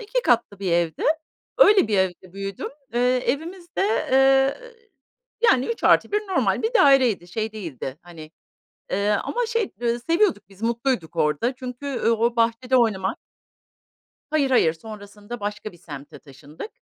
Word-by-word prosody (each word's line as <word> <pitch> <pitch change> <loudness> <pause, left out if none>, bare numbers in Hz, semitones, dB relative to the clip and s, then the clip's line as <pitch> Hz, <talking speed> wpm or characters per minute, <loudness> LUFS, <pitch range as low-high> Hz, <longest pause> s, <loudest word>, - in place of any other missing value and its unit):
2 465 +3 -2
katlı 235 - +1
bir 190 -3 -2
evdi. 170 -2 0 0.6
Öyle 415 - +6
bir 205 -3 +1
evde 185 -1 -2
büyüdüm. 195 0 -5 0.3
Iıı, 240 - +1 0.2
evimiz 340 +7 -3
de, - - 0 0.3
eee, 270 - +4 0.9
yani, 260 0 +2
3+1 420 -2 +2
normal 395 -3 0
bir 450 +2 -1
daireydi. 255 - +4
Şey 220 +3 -3
değildi, 155 - -7
hani, 165 -3 -12 0.6
eee, 200 +1 0
ama 465 - -1
şey, 460 -3 -1
ııı, 235 0 0
seviyorduk 335 - +1
biz, 195 +1 -18
mutluyduk 230 -7 -1
orada 155 - 0
çünkü 255 +1 -6
o 230 +1 +1
bahçede 235 +3 +1
oynamak 195 -6 +1 1.1
Hayır, 295 -3 +1
hayır 165 -11 +4
sonrasında 210 +5 -10
başka 210 +1 -5
bir 175 - -17
semte 145 -4 -10
taşındık. 145 - -11
230 Hz, 140 wpm, -23 LUFS, 190-270 Hz, 1.1 s, Öyle